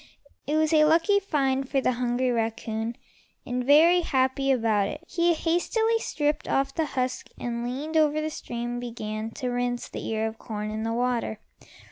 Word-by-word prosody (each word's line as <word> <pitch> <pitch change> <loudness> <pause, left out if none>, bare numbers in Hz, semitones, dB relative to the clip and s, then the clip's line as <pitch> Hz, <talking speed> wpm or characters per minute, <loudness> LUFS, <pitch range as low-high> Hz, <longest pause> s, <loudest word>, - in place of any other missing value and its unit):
It 295 - 0
was 315 0 +2
a 305 -1 +6
lucky 330 +6 +4
find 270 -8 0
for 275 - +2
the 260 - +2
hungry 250 +1 0
raccoon, 225 0 -2 0.5
and, 250 0 -2
very 320 +6 +6
happy 270 -3 +1
about 220 -5 +2
it, 300 - -7
he 340 0 +2
hastily 445 +8 +1
stripped 295 -7 -1
off 270 0 +1
the 320 -2 -1
husk 255 0 -1
and 235 -1 -3
leaning 275 +6 -4
over 305 -1 +3
the 310 0 -2
stream 240 -3 -4
began 220 -2 -5
to 255 -3 -3
rinse 245 0 -2
the - - -6
ear 220 0 -1
of 220 0 -5
corn 210 -2 -5
in 215 0 -3
the 225 +1 -1
water. 240 -2 -1
255 Hz, 175 wpm, -26 LUFS, 235-310 Hz, 0.5 s, a